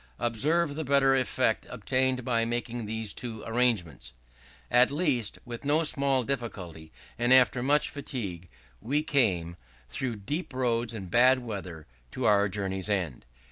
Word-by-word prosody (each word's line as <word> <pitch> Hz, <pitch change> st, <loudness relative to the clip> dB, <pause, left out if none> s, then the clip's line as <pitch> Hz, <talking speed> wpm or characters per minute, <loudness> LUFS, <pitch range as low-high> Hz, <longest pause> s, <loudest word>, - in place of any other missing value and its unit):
Observe 145 Hz, +7 st, +1 dB
the 160 Hz, +2 st, -4 dB
better 135 Hz, -1 st, +3 dB
effect 130 Hz, -1 st, 0 dB
obtained 130 Hz, -1 st, -1 dB
by 115 Hz, -2 st, +1 dB
making 120 Hz, -1 st, -3 dB
these 110 Hz, -1 st, -2 dB
two 115 Hz, -3 st, -4 dB
changes: 115 Hz, -, 0 dB, 0.6 s
"At 125 Hz, +1 st, +6 dB
last, 140 Hz, -, 0 dB
with 120 Hz, -1 st, -7 dB
no 150 Hz, +3 st, +2 dB
small 140 Hz, -4 st, +2 dB
difficulty, 95 Hz, -11 st, -5 dB, 0.3 s
and 120 Hz, +1 st, +1 dB
after 130 Hz, -1 st, +5 dB
much 145 Hz, +4 st, +2 dB
fatigue, 100 Hz, -, -6 dB, 0.3 s
we 145 Hz, +7 st, 0 dB
came, 90 Hz, -, 0 dB, 0.3 s
through 120 Hz, -, -3 dB
deep 140 Hz, -, -5 dB
roads 120 Hz, -2 st, -1 dB
and 95 Hz, -5 st, -7 dB
bad 125 Hz, +4 st, +5 dB
weather, 95 Hz, -, -7 dB, 0.3 s
to 130 Hz, -, -3 dB
our 100 Hz, -2 st, +4 dB
journey's 95 Hz, 0 st, -3 dB
end." 90 Hz, -12 st, -2 dB
120 Hz, 140 wpm, -28 LUFS, 100-130 Hz, 0.6 s, At